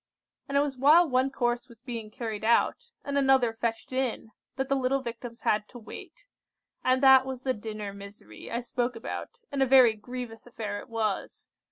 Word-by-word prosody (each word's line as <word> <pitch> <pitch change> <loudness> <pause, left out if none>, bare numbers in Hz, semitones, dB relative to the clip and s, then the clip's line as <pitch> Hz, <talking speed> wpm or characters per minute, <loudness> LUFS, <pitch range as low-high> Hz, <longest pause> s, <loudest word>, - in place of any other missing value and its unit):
And 280 - +1
it - - +5
was 285 -2 -2
while 315 +6 +6
one 260 0 +2
course 245 -1 -1
was 235 -2 -16
being 235 -3 -6
carried 220 -2 -5
out, 235 - +2 0.2
and 280 0 0
another 265 -4 +4
fetched 225 +2 -3
in, 255 -4 -2 0.2
that 265 0 -2
the 275 - +1
little 265 0 0
Victims 235 0 -7
had 210 0 +1
to 245 - -11
wait; 235 - -11 0.6
and 255 +1 +2
that 265 -1 +8
was 260 -1 -6
the 260 - +1
dinner 210 -2 -6
misery 200 - -11
I 235 - -2
spoke 245 0 -2
about, 235 - -7
and 280 -1 -1
a 265 - +4
very 255 -3 +7
grievous 235 +1 -8
affair 210 -4 -5
it - - -12
was. 220 -3 -3
245 Hz, 190 wpm, -28 LUFS, 225-265 Hz, 0.6 s, that